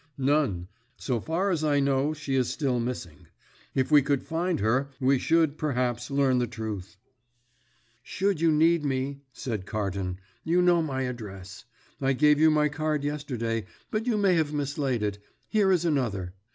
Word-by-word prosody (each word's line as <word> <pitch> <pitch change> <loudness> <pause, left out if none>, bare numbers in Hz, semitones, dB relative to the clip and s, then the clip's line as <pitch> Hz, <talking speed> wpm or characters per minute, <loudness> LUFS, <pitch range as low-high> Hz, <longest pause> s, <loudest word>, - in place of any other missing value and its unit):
"None. 135 - +1 0.3
So 125 -4 -1
far 175 - -1
as 160 -3 -1
I 145 -2 +3
know, 140 +1 +2
she 145 -3 -4
is 130 -2 +2
still 135 -5 0
missing. 90 -9 -5 0.5
If 130 +2 0
we 150 -1 +7
could 140 0 0
find 170 +2 -1
her 125 +7 +1
we 135 0 +3
should, 160 -1 +2
perhaps, 125 -5 -1
learn 135 -2 +2
the 120 - 0
truth." 110 -4 -6 1.0
"Should 190 +5 -1
you 165 -1 +4
need 160 +1 +3
me," 135 0 -2
said 110 -7 -5
Carton, 95 -4 -3 0.3
"you 170 +2 +2
know 175 -1 +4
my 135 -4 -2
address. 105 -6 -7 0.4
I 135 0 +2
gave 150 +2 +4
you 160 0 +6
my 150 -1 +3
card 150 0 -1
yesterday, 120 -7 -3 0.2
but 220 +3 -2
you 230 -3 +2
may 200 -3 +3
have 160 -3 +1
mislaid 140 -5 -1
it. 105 -1 -2 0.3
Here 205 -3 +3
is 175 -2 +2
another. 110 - -1
140 Hz, 165 wpm, -27 LUFS, 120-155 Hz, 1.0 s, we